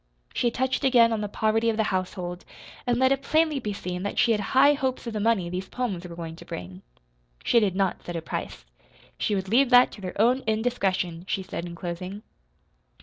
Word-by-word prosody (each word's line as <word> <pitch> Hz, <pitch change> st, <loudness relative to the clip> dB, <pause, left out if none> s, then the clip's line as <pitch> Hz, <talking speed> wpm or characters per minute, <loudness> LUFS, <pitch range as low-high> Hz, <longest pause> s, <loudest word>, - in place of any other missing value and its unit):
She 240 Hz, -, +1 dB
touched 260 Hz, +3 st, -1 dB
again 240 Hz, -4 st, +5 dB
on 220 Hz, -, -1 dB
the 210 Hz, -, -2 dB
poverty 220 Hz, +2 st, +1 dB
of 220 Hz, -, -1 dB
the 220 Hz, -, +3 dB
household, 180 Hz, -1 st, -3 dB, 0.4 s
and 240 Hz, -1 st, +2 dB
let 260 Hz, +1 st, +4 dB
it 275 Hz, 0 st, +1 dB
plainly 310 Hz, 0 st, +2 dB
be 215 Hz, -5 st, -3 dB
seen 180 Hz, -3 st, -5 dB
that 200 Hz, -, -4 dB
she 235 Hz, -, +4 dB
had 210 Hz, -2 st, +2 dB
high 270 Hz, +7 st, +5 dB
hopes 265 Hz, -3 st, -2 dB
of 230 Hz, -, -4 dB
the 215 Hz, -, -2 dB
money 210 Hz, -4 st, +2 dB
these 185 Hz, +2 st, -5 dB
poems 195 Hz, -8 st, -3 dB
were 170 Hz, -, -9 dB
going 165 Hz, -1 st, -6 dB
to -, -, -11 dB
bring. 90 Hz, +1 st, -8 dB, 0.6 s
She 235 Hz, -, +4 dB
did 200 Hz, -4 st, 0 dB
not 190 Hz, -2 st, 0 dB
set 175 Hz, -, -6 dB
a 165 Hz, -, -2 dB
price. -, -, -5 dB, 0.5 s
She 210 Hz, -, 0 dB
would 190 Hz, -1 st, -2 dB
leave 245 Hz, +6 st, +4 dB
that 245 Hz, 0 st, +7 dB
to 205 Hz, -, -11 dB
their 185 Hz, +1 st, -6 dB
own 245 Hz, +4 st, +4 dB
indiscretion, 195 Hz, -7 st, 0 dB
she 195 Hz, -, -1 dB
said 175 Hz, -2 st, -5 dB
in 170 Hz, -, -8 dB
closing. 180 Hz, +4 st, -6 dB
210 Hz, 215 wpm, -26 LUFS, 180-245 Hz, 0.6 s, that